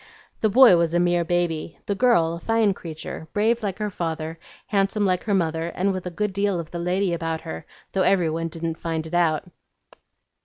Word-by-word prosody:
The 220 - +2
boy 235 -4 +7
was 170 0 +1
a - - +4
mere 175 0 +2
baby; 170 -2 -1
the 200 - 0
girl 200 -7 +3
a 170 - -5
fine 225 0 +2
creature, 160 -2 -8
brave 225 +3 +2
like 200 -3 -3
her 210 -1 -3
father, 165 -2 -4 0.3
handsome 200 +1 +1
like 185 -2 0
her 210 - 0
mother, 165 -2 0
and 195 +2 +1
with 185 -1 -4
a - - -2
good 205 +3 -2
deal 200 -2 0
of 165 -2 -7
the 170 - -4
lady 180 +1 0
about 165 -1 -2
her, 80 - -7 0.2
though 195 - 0
every 180 -4 +3
one 165 +1 -2
didn't 165 0 -4
find 165 -1 -3
it 160 - -9
out." 165 -3 +2
175 Hz, 205 wpm, -24 LUFS, 165-200 Hz, 0.3 s, boy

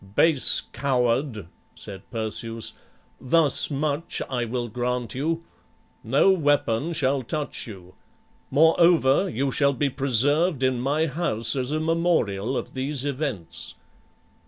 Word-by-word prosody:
"Base 160 -5 +4
coward," 125 - 0 0.3
said 95 -1 -9
Perseus, 115 0 -2 0.5
"thus 150 +2 +3
much 145 +2 -1
I 120 -2 -1
will 120 +1 -3
grant 120 0 -3
you; 165 +5 -2 0.6
no 135 - +4
weapon 145 -4 +1
shall 135 -3 +1
touch 145 +3 -4
you; 95 -4 -11 0.6
moreover, 160 +2 +4
you 140 -3 -1
shall 140 +1 +2
be 140 +1 0
preserved 140 +4 +1
in 130 -2 +1
my 145 +5 +1
house 150 -6 +1
as 130 -1 -2
a 155 - 0
memorial 155 - 0
of - - -5
these 135 +1 -3
events." 135 - -4
135 Hz, 120 wpm, -24 LUFS, 120-155 Hz, 0.6 s, Base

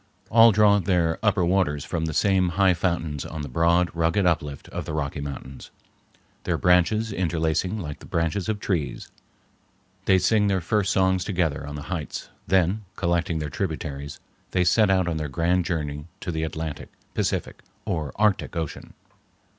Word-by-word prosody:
All 115 +1 +8
draw 105 -1 +5
their 85 -3 +1
upper 100 -4 +2
waters 85 -6 +1
from 80 -1 -2
the 80 - -3
same 95 -2 +3
high 95 -2 +5
fountains 85 -4 -1
on 80 -2 -6
the - - -5
broad, 85 +6 +2
rugged 85 +4 +1
uplift 75 -5 -1
of - - -5
the - - -5
Rocky 70 -1 -2
Mountains, 70 -1 -7 0.7
their - - 0
branches 100 +5 +3
interlacing 85 +2 0
like 75 -8 -6
the - - -13
branches 85 +4 -1
of 105 -1 -1
trees. 85 -8 -3 0.9
They 95 - +5
sing 105 +3 +3
their 95 -1 +2
first 100 +2 0
songs 95 -1 +2
together 80 -6 -1
on 75 - -6
the 75 - -6
heights; 80 -4 -5 0.2
then, 95 +3 +2
collecting 85 -1 0
their 75 -2 -4
tributaries, 70 -5 -4 0.3
they 90 - +1
set 105 +4 +4
out 95 -2 +3
on 85 -2 -1
their 75 -2 -3
grand 85 +6 +1
journey 75 -4 -3
to 90 - -3
the 80 -1 -2
Atlantic, 80 -1 -4 0.2
Pacific, - - -2 0.2
or 80 -4 -2
Arctic 105 -3 +1
Ocean. 80 -3 -5
85 Hz, 165 wpm, -25 LUFS, 80-95 Hz, 0.9 s, All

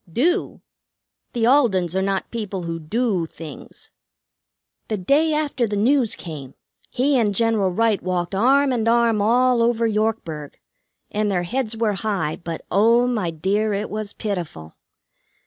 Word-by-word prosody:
"Do? 340 - 0 0.7
The 235 -3 +1
Aldens 205 - +3
are 190 - +1
not 195 0 -2
people 205 -5 -4
who 165 0 -4
'do' 190 +1 -1
things. 160 -1 -11 1.0
The 215 - -2
day 285 - +2
after 295 -5 0
the 205 - -3
news 240 +3 +2
came, 145 -6 -9 0.3
he 265 +1 +1
and 210 -3 +1
General 225 -3 +2
Wright 220 +2 +1
walked 180 0 -2
arm 265 +7 +3
and 230 -2 -1
arm 230 -2 +3
all 245 +3 +3
over 230 0 +2
Yorkburg, 210 -9 -2 0.6
and 210 0 0
their 180 -3 0
heads 225 +3 -2
were 220 -2 +1
high; 195 -6 -2
but 165 -1 -7
oh, 230 +5 +4
my 220 -8 -1
dear, 200 +7 0
it 205 +2 -3
was 215 -1 -4
pitiful. 170 - -5
215 Hz, 145 wpm, -22 LUFS, 185-235 Hz, 1.0 s, oh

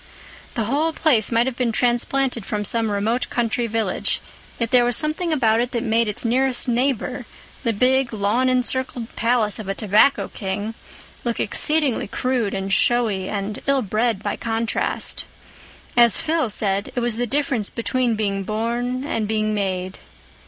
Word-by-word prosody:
The 230 - 0
whole 295 +8 0
place 250 -11 +2
might 230 +1 +3
have 260 -2 -2
been 245 -2 0
transplanted 245 +1 +1
from 210 +1 -3
some 225 +1 +2
remote 215 +4 0
country 240 0 0
village; 225 0 -1 0.4
yet 230 -1 -2
there 250 -1 +6
was 240 0 +1
something 320 +2 -1
about 230 -7 +3
it 240 +1 0
that 235 -1 -1
made 230 -1 +2
its 210 +3 -3
nearest 255 +2 +1
neighbor, 250 0 -1 0.3
the 235 - +1
big 255 +3 +2
lawn 220 +4 +1
encircled 255 -1 0
palace 230 -2 +1
of 215 - -7
a 195 - -1
tobacco 215 +7 +3
king, 205 +2 -4 0.5
look 235 -1 -2
exceedingly 300 +3 0
crude 250 -6 -1
and 195 0 -2
showy 215 -5 +2
and 205 +1 -4
ill 275 -2 +2
bred 215 0 0
by - - -1
contrast. 225 0 -1 0.7
As 235 -2 +6
Phil 320 -5 0
said, 200 -1 0
it - - +1
was 240 -2 -1
the 245 0 -1
difference 270 -5 0
between 240 0 0
being 200 -2 -1
born 235 +5 -2
and 225 -7 -1
being 215 0 0
made. 190 -2 -2
235 Hz, 160 wpm, -22 LUFS, 215-255 Hz, 0.7 s, there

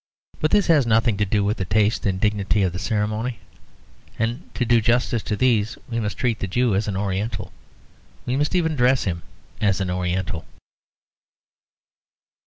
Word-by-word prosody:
But 155 - +1
this 205 +3 +3
has 150 -7 +4
nothing 115 0 +3
to 105 - +1
do 105 +1 +1
with 105 +2 0
the 95 - -2
taste 105 +3 +1
and 95 -1 0
dignity 105 0 +1
of 90 -2 0
the 90 - -4
ceremony; 110 +3 -1 0.8
and 120 +8 -3
to 125 - 0
do 120 0 +4
justice 120 0 +1
to 105 - -2
these 115 -2 +1
we 115 -1 -2
must 105 -2 -3
treat 120 -3 0
the 100 - -2
Jew 120 +4 +1
as 100 +3 0
an 100 -2 -2
oriental; 100 +2 -3 0.7
we 125 - -1
must 145 +6 0
even 160 -3 +1
dress 130 0 +3
him 85 -3 -2 0.4
as 100 -3 +2
an 95 -2 -1
oriental. 90 -2 -2
110 Hz, 175 wpm, -23 LUFS, 100-120 Hz, 0.8 s, has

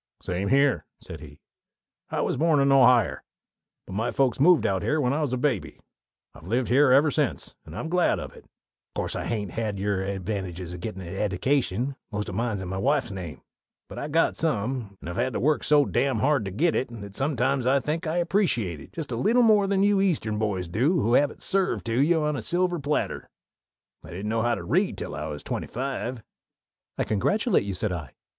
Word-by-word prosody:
"Same 90 +2 -2
here," 140 +2 +2
said 80 - -9
he. 75 0 -13 0.7
"I - - -1
was - - 0
born 155 +1 +3
in 140 0 +3
Ohier; 125 -4 +5 0.7
but - - -9
my 110 +4 -1
folks 130 -3 +1
moved 170 +3 +5
out 95 -1 +1
here 155 - 0
when 125 -2 +1
I 155 - 0
was 145 -5 -1
a 130 - 0
babby. 130 0 -1 0.5
I've 80 - -14
lived 120 +4 0
here 130 +2 +5
ever 145 +4 +5
since 145 -4 -1
and 80 - -9
I'm 160 - -4
glad 180 +1 +2
of - - -7
it. - - -15
Of - - -42
course - - -1
I - - -3
hain't 105 -5 -3
had 110 -3 -3
your 100 -1 -1
advantages 95 -2 -4
in 90 - -7
gettin' 95 0 -6
an 85 +2 -7
eddication 120 +5 0 0.2
most 105 -2 -3
o' - - -8
mine's 110 -2 -2
in - - -6
my 95 +1 -3
wife's 100 - +1
name 90 -5 -7 0.4
but - - -8
I've 145 - -5
got 165 +2 +2
some, 120 -7 -2
and - - -8
I've 85 - -5
had 130 - 0
to - - -1
work 150 +4 +1
so 145 -1 +4
dam 135 -2 0
hard 135 -1 +2
to 95 - -4
get 160 - +1
it 130 - 0
that 100 -1 -9
sometimes 135 -2 0
I 135 +2 +4
think 160 +5 -3
I 160 +2 -1
appreciate 170 - +1
it - - -14
just 160 -5 -5
a - - -1
leetle 230 - +3
more 210 -3 +4
than 195 0 +2
you 200 -1 +3
Eastern 140 - 0
boys 100 -5 -1
do 130 - +1
who 115 +3 +1
have 145 +2 +4
it - - -13
served 195 -1 0
to 115 +1 0
you 160 +1 +3
on 150 0 0
a - - -3
silver 175 0 0
platter. 145 +1 -2 0.7
I - - -12
didn't 95 +5 -5
know 115 0 0
how 120 +1 +1
to 100 - -7
read - - +1
till - - -5
I - - -4
was 75 -1 -6
twenty - - -4
five." 130 -2 -4 0.7
"I - - +1
congratulate 200 - +1
you," 100 -2 -3
said 105 +2 -1
I. 80 -7 -6
125 Hz, 220 wpm, -26 LUFS, 100-150 Hz, 0.7 s, Ohier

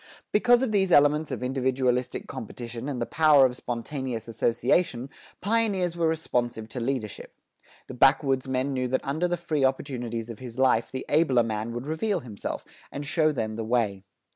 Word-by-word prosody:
Because 245 +3 +4
of 255 - 0
these 190 -3 +2
elements 150 +1 +4
of 125 -3 -4
individualistic 130 -1 0
competition 120 +2 -6
and 135 -4 -3
the 120 - -1
power 150 -2 +5
of 125 -1 0
spontaneous 120 -1 -4
association, 120 +4 0 0.3
pioneers 200 -5 +1
were 170 -1 +1
responsive 120 -8 -1
to 125 - -5
leadership. 120 -3 -4 0.5
The - - -9
backwoodsmen 135 0 +2
knew 130 -1 -1
that 130 +1 -1
under 155 +6 0
the 175 0 -1
free 160 -4 -1
opportunities 120 -3 -2
of 110 - -10
his 125 -2 -9
life 130 -3 +3
the 130 - -5
abler 140 -6 +3
man 110 0 -3
would 120 +2 -5
reveal 175 +5 -1
himself, 110 -6 -6 0.3
and 145 +1 -5
show 155 +1 +2
them 110 -6 -3
the 115 - -2
way. 110 -4 0
130 Hz, 165 wpm, -26 LUFS, 120-155 Hz, 0.5 s, power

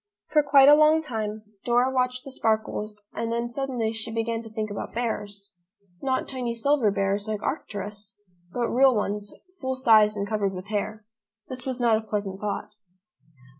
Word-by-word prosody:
For 305 - +5
quite 280 -2 +6
a 290 - +10
long 310 +1 +5
time 215 -5 -3 0.2
Dora 245 +2 +3
watched 255 +1 0
the 275 - -8
sparkles 215 -3 -1
and 230 0 -3
then 235 +1 -2
suddenly 245 -4 -2
she 225 +1 -5
began 225 0 -1
to 225 - -10
think 215 -1 -4
about 205 - -6
bears, 205 -4 -3 0.5
not 260 -1 0
tiny 245 -3 -3
silver 265 -1 +2
bears 200 +1 0
like 215 -1 -3
Arcturus, 205 -6 -5 0.4
but 240 +3 -1
real 260 0 +5
ones, 205 0 -2 0.3
full 260 -2 -2
sized 215 -4 +5
and 200 0 -2
covered 205 -3 0
with 185 +2 -8
hair. 215 +1 -3 0.4
This 255 0 -5
was 260 -1 -2
not 235 -3 +4
a - - -3
pleasant 205 -3 -4
thought. 210 0 -3
225 Hz, 170 wpm, -26 LUFS, 210-255 Hz, 0.5 s, a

